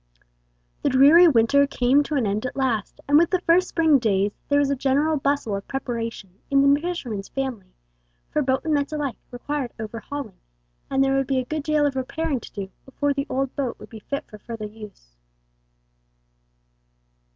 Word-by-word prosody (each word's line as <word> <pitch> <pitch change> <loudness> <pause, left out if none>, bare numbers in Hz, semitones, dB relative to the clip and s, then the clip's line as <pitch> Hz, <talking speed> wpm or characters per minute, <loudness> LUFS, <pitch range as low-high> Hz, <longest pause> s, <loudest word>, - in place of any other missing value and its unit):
The - - +1
dreary 290 +7 +7
winter 280 +1 +4
came 260 +1 +3
to 300 - -3
an 260 -5 +1
end 210 +4 -1
at - - -8
last, 245 -7 -1
and 290 +2 +6
with 340 - +3
the 370 -2 0
first 360 +1 +3
spring 320 -4 +3
days 205 -3 +1 0.2
there 285 - +3
was 285 -1 +2
a - - +1
general 280 +4 +1
bustle 280 -6 0
of 200 - -6
preparation 230 -7 -5
in 275 0 +5
the 290 - +1
fisherman's 250 - -4
family, 250 -9 -5 0.6
for 300 - +1
boat 260 -1 +1
and 315 - +1
nets 285 0 0
alike 295 -4 -3
required 255 +1 -4
overhauling, 225 +1 -6 0.5
and 270 0 +2
there 270 0 +2
would 270 -1 0
be 270 - 0
a 255 - 0
good 310 +3 -3
deal 300 0 +1
of 280 -2 0
repairing 275 +2 -2
to - - -12
do 195 -2 -6
before 285 +2 -1
the 275 +1 -3
old 265 0 -2
boat 265 -4 -2
would - - -13
be 220 - -10
fit 280 +7 -5
for 210 - -12
further 225 -1 -7
use. 210 - -12
270 Hz, 185 wpm, -23 LUFS, 230-290 Hz, 0.6 s, dreary